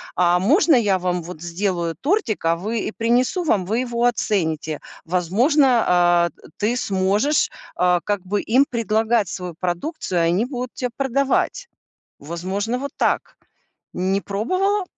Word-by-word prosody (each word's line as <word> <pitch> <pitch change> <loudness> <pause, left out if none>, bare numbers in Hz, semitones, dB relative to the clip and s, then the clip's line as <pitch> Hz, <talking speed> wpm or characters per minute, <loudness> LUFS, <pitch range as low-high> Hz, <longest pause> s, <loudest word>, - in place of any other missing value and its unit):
А 175 0 +3
можно 305 - +4
я 205 -6 +3
вам 180 -1 -1
вот 165 -2 -9
сделаю 175 -1 -2
тортик, 305 - 0
а, 165 +1 +2
вы 215 +6 -3
и - - -3
принесу 245 - +1
вам, 200 - +2
вы 220 +6 0
его 235 0 -2
оцените?" 160 -10 0 0.3
Возможно, 205 - +2 0.2
а, 175 -1 +4
э, - - -24 0.3
ты 220 +4 0
сможешь, 205 +8 +1 0.3
а, 180 0 +3
как 205 -2 -1
бы, 200 +2 -1
им 275 +2 +6
предлагать 225 -2 +1
свою 180 -2 -5
продукцию, 180 - -2
и - - +2
они 195 +7 +1
будут 250 -2 -5
те 250 - -3
продавать. 275 - 0 0.5
Возможно, 190 - -3
вот 280 +2 -4
так. - - 0 0.6
Не 190 +2 0
пробовала? 370 - 0
205 Hz, 150 wpm, -21 LUFS, 180-250 Hz, 0.6 s, им